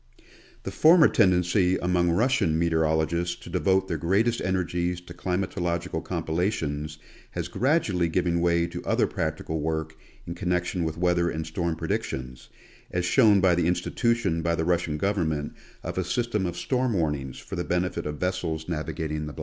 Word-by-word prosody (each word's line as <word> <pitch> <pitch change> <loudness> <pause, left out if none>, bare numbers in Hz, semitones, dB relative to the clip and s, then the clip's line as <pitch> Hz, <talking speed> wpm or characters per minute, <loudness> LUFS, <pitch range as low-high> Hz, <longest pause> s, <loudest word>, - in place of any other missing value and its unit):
The - - -4
former 160 0 +6
tendency 90 0 +3
among 90 -1 +1
Russian 85 -4 +2
meteorologists 80 +1 +1
to 85 - -12
devote 95 +1 +2
their 80 -4 -2
greatest 105 +9 +1
energies 90 -1 -1
to 90 -1 -11
climatological 85 -2 -2
compilations 80 -3 -2 0.4
has - - -3
gradu 140 - +1
ally 90 -1 +1
given 85 +1 0
way 85 -1 +2
to 85 - -6
other - - +2
practical 80 0 -3
work 80 0 -2 0.3
in 85 - -5
connection 90 0 -1
with 80 0 -3
weather 90 0 +2
and 80 -1 -3
storm 85 +1 -2
predictions, 65 -4 -4 0.4
as 90 0 -1
shown 105 -1 +5
by 95 -2 +4
the 85 -1 +1
institution 95 +1 0
by 85 +1 +1
the 80 - -1
Rus 85 0 +2
sian 75 -2 -3
government 80 -5 -1 0.3
of - - -3
a - - +1
system 105 +1 -1
of 85 - -5
storm 125 -2 0
warnings 75 -7 -1
for - - -8
the 90 - -2
benefit 90 -2 -1
of 75 0 -4
vessels 80 -3 -2
navigating 75 -2 -3
the. 75 - -8
85 Hz, 165 wpm, -26 LUFS, 80-95 Hz, 0.4 s, former